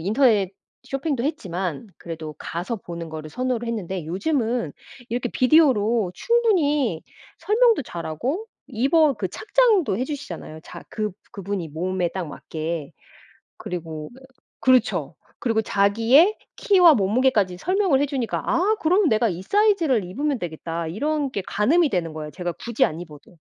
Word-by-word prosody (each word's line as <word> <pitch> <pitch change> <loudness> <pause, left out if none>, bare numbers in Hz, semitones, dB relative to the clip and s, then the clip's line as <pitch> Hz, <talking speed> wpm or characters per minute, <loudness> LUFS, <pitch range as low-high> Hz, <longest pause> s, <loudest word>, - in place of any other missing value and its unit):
인터넷 205 - +2 0.3
쇼핑도 270 -2 -2
했지만 190 - -3
그래도 160 -2 -7
가서 175 +8 -4
보는 170 -4 -8
거를 155 -1 -7
선호를 245 +3 -2
했는데 190 -7 -4
요즘은 225 - -1 0.4
이렇게 240 +1 -1
비디오로 240 - +3
충분히 300 - +1 0.4
설명도 455 -3 +3
잘 170 -9 -7
하고 260 - -3 0.2
입어 280 +5 +3
그 190 -5 -3
착장도 420 - +2
해주시잖아요. 255 - -6
자 - - -10
그 215 -1 -2 0.2
그분이 195 -5 -4
몸에 180 +3 -1
딱 180 -1 -5
맞게. 155 0 -5 0.7
그리고 160 -3 -6 0.5
그렇죠. 215 - +2 0.3
그리고 225 -3 +1
자기의 230 - +4 0.2
키와 360 -6 +6
몸무게까지 210 -3 +2
설명을 365 - +2
해주니까 265 -6 -2
'아 410 +6 +2
그럼 360 +3 +3
내가 220 +1 +3
이 180 -2 -4
사이즈를 345 - +2
입으면 280 +8 -2
되겠다.' 165 -2 -4
이런 290 - -1
게 200 - -2
가늠이 295 +9 +2
되는 165 -4 -2
거예요. 155 -1 -6
제가 175 +1 -4
굳이 235 +5 0
안 155 - -6
입어도. 160 0 -13
225 Hz, 320 characters per minute, -23 LUFS, 175-290 Hz, 0.7 s, 키와